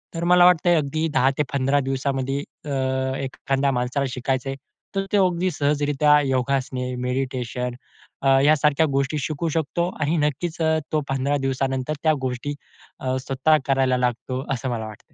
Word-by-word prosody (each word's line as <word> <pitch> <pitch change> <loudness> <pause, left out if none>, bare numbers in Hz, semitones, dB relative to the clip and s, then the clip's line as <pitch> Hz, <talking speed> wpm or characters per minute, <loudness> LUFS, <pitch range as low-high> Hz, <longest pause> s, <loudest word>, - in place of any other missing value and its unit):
तर 165 - -3
मला 180 0 +6
वाटतंय 175 -1 +5
अगदी 155 +1 0
10-15 135 0 +2
दिवसामध्ये 135 0 -1 0.3
अ, 130 -1 -1
एखाद्या 135 +1 -1
माणसाला 125 +2 -1
शिकायचं 130 +1 -2
आहे, 135 - -3 0.4
तर 195 0 0
ते 205 - +3
अगदी 185 -1 +2
सहजरीत्या 145 0 +3
योगासने, 130 -1 -1
मेडिटेशन 125 -1 -3 0.5
अ, 135 0 +4
यासारख्या 150 0 +4
गोष्टी 140 +2 0
शिकू 160 +2 -2
शकतो 165 +3 -1
आणि 155 +3 +1
नक्कीच 160 +3 -3
अ, 160 0 +3
तो 155 - +1
15 135 +2 0
दिवसानंतर 135 +2 -1
त्या 155 - +4
गोष्टी 130 +3 -3 0.4
अ, 130 0 -1
स्वतः 140 +4 +3
करायला 135 -2 +2
लागतो, 125 +2 -2
असं 130 +1 -3
मला 115 -2 -3
वाटतं. 105 - -14
135 Hz, 145 wpm, -23 LUFS, 130-155 Hz, 0.5 s, मला